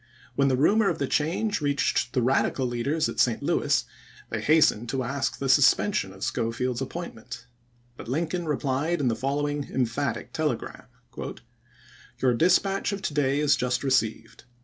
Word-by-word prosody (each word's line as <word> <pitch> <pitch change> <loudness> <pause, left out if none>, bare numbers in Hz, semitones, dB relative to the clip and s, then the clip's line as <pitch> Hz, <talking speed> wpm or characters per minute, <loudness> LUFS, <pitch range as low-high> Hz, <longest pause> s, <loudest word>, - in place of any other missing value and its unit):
When 140 - +2
the 130 -2 +2
rumor 205 +9 +3
of 170 - -2
the 140 - -1
iMd.,p.277. - - -9
change 185 +6 0
reached 140 -4 0
the 125 - +1
Eadical 130 +1 +1
leaders 140 +7 0
at - - -5
St. 120 -3 +2
Louis - - +1 0.5
they - - -2
hastened 150 -7 +3
to 130 +2 -1
ask 135 +2 -2
the 140 - -3
suspension 135 - +3
of 95 +1 -10
Schofield's 120 +2 -2
appointment; 135 -6 -7 0.5
but - - -9
Lincoln 165 +6 -2
replied 150 +3 -1
in 135 -4 +1
the 115 - 0
following 145 +3 -2
emphatic 130 +2 -2
telegram: 150 -7 -3 1.3
"Your 125 -1 +2
dispatch 190 - +2
of 200 -1 -5
to 155 - -2
day 140 -1 +1
is 150 -1 +4
just 125 +1 -1
received. 115 -4 -1
140 Hz, 160 wpm, -26 LUFS, 125-155 Hz, 1.3 s, is